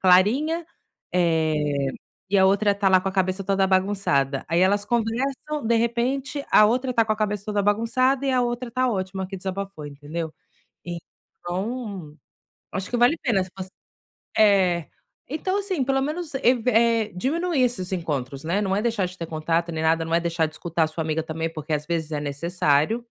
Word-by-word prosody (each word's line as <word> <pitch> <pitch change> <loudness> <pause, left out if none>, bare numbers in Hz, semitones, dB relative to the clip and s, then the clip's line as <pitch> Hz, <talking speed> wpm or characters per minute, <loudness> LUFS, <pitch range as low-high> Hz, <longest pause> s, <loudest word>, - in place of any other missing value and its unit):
clarinha, 245 - +4 0.5
eh, 155 -5 +1 0.4
e 200 - +4
a 190 - +6
outra 200 +1 +3
tá 200 -1 +2
lá 185 -1 +5
com - - -1
a 190 - -4
cabeça 190 0 0
toda 195 0 +2
bagunçada. 185 -8 +1
Aí 170 +1 +2
elas 200 +2 +3
conversam, 250 +5 -1
de 235 +1 +3
repente, 250 +5 -1
a 215 - +7
outra 255 +4 +1
tá 230 - +4
com 215 - +1
a - - -3
cabeça 210 -2 -1
toda 210 -1 0
bagunçada 245 +6 +2
e 270 - +2
a 255 - +3
outra 240 0 -3
tá 255 +2 +1
ótima 190 -3 -2
que 195 +1 -7
desabafou, 190 -3 -5
entendeu? 150 +3 -6 0.5
Então, 180 +1 -6 0.6
acho 190 +1 -4
que 245 - 0
vale 245 +6 +5
a - - -11
pena 215 -9 +2
se 185 - -15
você 190 0 -6 0.7
é. 190 -6 +4 0.4
Então, 370 +7 -1
assim, 375 -9 -1 0.2
menos, 305 +1 -4
ev 250 -3 +3
eh, 230 -1 +3
diminuir 315 - 0
esses 200 -7 -1
encontros, 145 -6 -3
né, 175 +5 0
não 190 -1 0
é 205 - 0
deixar 225 -5 0
de 180 +1 -11
ter 165 - -4
contato 165 +2 -1
nem 160 -1 -3
nada, 165 +1 +2
não 165 0 -2
é 170 - +4
deixar 170 -1 0
de 155 - -11
escutar 165 0 0
a - - +1
sua 160 +1 -4
amiga 155 0 -1
também, 160 +1 -3
porque 155 -1 -5
às 150 0 -1
vezes 160 -2 -2
é 150 - -1
necessário. 150 - 0
195 Hz, 190 wpm, -24 LUFS, 165-235 Hz, 0.7 s, a